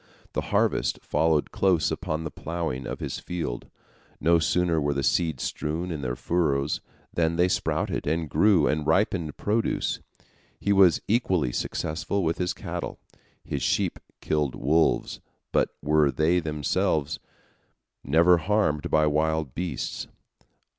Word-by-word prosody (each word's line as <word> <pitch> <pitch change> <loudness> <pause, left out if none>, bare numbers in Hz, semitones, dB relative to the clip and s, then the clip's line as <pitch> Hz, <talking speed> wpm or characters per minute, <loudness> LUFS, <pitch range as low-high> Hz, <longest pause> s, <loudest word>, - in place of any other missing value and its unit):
The - - -3
harvest - - +1
followed 80 -2 +1
close 90 -6 +2
upon 80 +1 -3
the 80 - -5
ploughing 80 -6 -4
of - - -5
his - - -4
field; 85 -9 -5 0.5
no 85 +2 +4
sooner 85 0 +1
were 70 0 0
the 70 - -1
seeds 80 -3 +1
strewn 80 +4 -3
in 75 -3 -4
the 60 -2 -2
furrows, 75 -2 0 0.3
than 85 -1 +1
they 90 +2 +3
sprouted 90 - -1
and 80 +1 0
grew 95 -1 +4
and 75 0 0
ripened 85 -2 +1
produce. 110 +2 0 0.6
He 100 - +1
was 95 -5 +5
equally 95 - +1
successful 90 +10 -2
with 80 0 -1
his 90 -1 0
cattle. - - -5 0.5
His 70 - -4
sheep - - 0 0.2
killed 75 -4 0
wolves, 80 +5 +1 0.3
but - - +2
were 75 0 +3
themselves 75 -1 0 0.8
never 85 +5 +5
harmed 90 -6 +1
by 75 0 +3
wild 80 -2 0
beasts. 90 +3 -4
80 Hz, 135 wpm, -26 LUFS, 75-90 Hz, 0.8 s, was